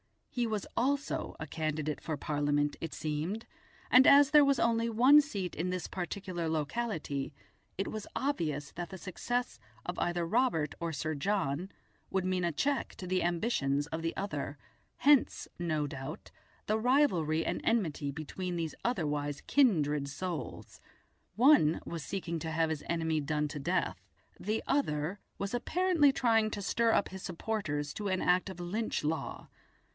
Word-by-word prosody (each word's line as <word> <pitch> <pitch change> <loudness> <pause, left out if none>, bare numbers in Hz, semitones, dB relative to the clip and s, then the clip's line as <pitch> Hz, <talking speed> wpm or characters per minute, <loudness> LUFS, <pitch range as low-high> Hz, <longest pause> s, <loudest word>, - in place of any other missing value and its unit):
He 240 -2 0
was 215 -3 -2
also 280 +4 0
a - - -2
candidate 155 -1 -2
for 160 -1 -3
Parliament, 145 0 0
it 165 - -4
seemed, 160 +8 -3 0.5
and 255 +1 +8
as 285 +1 +7
there 300 -1 +8
was 275 -1 +3
only 230 0 +2
one 255 +7 +7
seat 200 -11 -4
in 175 +3 -1
this 180 -1 -2
particular 180 -1 -4
locality, 155 - -2 0.4
it 195 - -1
was 215 -1 -5
obvious 155 - -1
that 175 0 -6
the 190 - -7
success 245 +7 -3 0.3
of - - -4
either 175 0 0
Robert 165 - +1
or 170 -1 -2
Sir 155 +2 -2
John 175 0 -1 0.4
would 190 -1 0
mean 185 -1 +1
a 170 - 0
check 275 - -1
to 185 - -7
the 185 0 +1
ambitions 165 - +1
of 160 0 -4
the 165 0 -2
other, 150 -7 -3 0.4
hence, 285 -1 +4
no 155 -4 0
doubt, 135 +2 -7 0.3
the 215 +1 +1
rivalry 190 - +3
and - - -1
enmity 165 -11 0
between 170 +5 -4
these 165 -2 -2
otherwise 145 - -1
kindred 150 - +3
souls. 160 -1 -5 0.6
One 230 - +5
was 165 -3 -5
seeking 170 -3 -3
to 160 +1 -4
have 165 0 +1
his 155 -2 -4
enemy 160 -2 +1
done 150 0 -1
to 150 - -5
death, 135 - -1 0.4
the 215 +3 -1
other 180 - 0 0.2
was 200 +2 -3
apparently 330 +3 +3
trying 225 -4 +3
to 205 - -4
stir 230 +3 +2
up 205 - +2
his 190 0 -8
supporters 165 -6 -3
to 210 - -3
an 185 -1 0
act 180 +2 +2
of 190 - -8
"Lynch 210 +6 -2
law". 155 +2 -3
175 Hz, 160 wpm, -32 LUFS, 155-225 Hz, 0.6 s, and